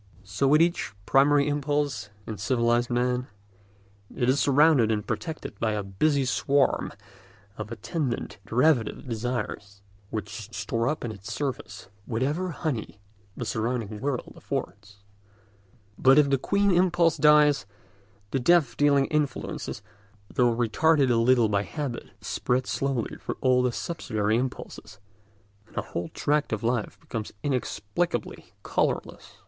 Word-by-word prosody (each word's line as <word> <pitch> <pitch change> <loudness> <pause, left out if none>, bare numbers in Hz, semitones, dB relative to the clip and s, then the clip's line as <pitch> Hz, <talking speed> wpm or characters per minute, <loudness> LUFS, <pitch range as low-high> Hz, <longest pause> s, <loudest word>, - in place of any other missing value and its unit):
So 100 +8 0
with 150 +4 +6
each 170 -10 -1
primary 140 +1 +4
impulse 145 -7 -1 0.2
in 110 - -6
civilised 120 +1 +1
man: 125 +1 0 0.9
it 120 - +1
is 135 +2 +3
surrounded 140 -5 +4
and 105 -1 -1
protected 160 - -5
by 110 -1 0
a 105 -1 -2
busy 135 +9 +1
swarm 135 +5 +1 0.6
of 110 0 -7
attendant 120 - -3
derivative 125 +1 +2
desires, 110 -4 -4 0.3
which 110 0 -6
store 115 +1 -1
up 150 -3 -1
in 115 - -3
its 100 -1 -9
service 140 -8 -4 0.2
whatever 145 +10 -1
honey 145 -10 -4 0.4
the - - -3
surrounding 110 -2 -2
world 135 -3 -3
affords. 100 -1 -6 1.0
But 135 +1 +6
if 145 -2 +5
the 135 - +3
queen 200 +6 +2
impulse 175 -2 +3
dies, 150 -7 +5 0.6
the 135 - +1
death 155 -2 +3
dealing 140 -1 +4
influence, 150 -3 -2 0.5
though 125 -3 +3
retarded 135 +4 +3
a - - +3
little 115 0 +4
by 100 -1 +1
habit, 135 +1 -5
spreads 125 +1 -1
slowly 135 -4 -2
through - - -4
all 130 -1 +3
the 125 -1 +1
subsidiary 110 -8 -1
impulses, 125 -5 -5 0.7
and - - -19
a - - 0
whole 85 +1 -4
tract 150 0 0
of 110 +1 -2
life 120 -2 -1
becomes 110 -2 -5
inexplicably 125 +3 -2 0.2
colourless. - - -2
125 Hz, 130 wpm, -26 LUFS, 110-145 Hz, 1.0 s, with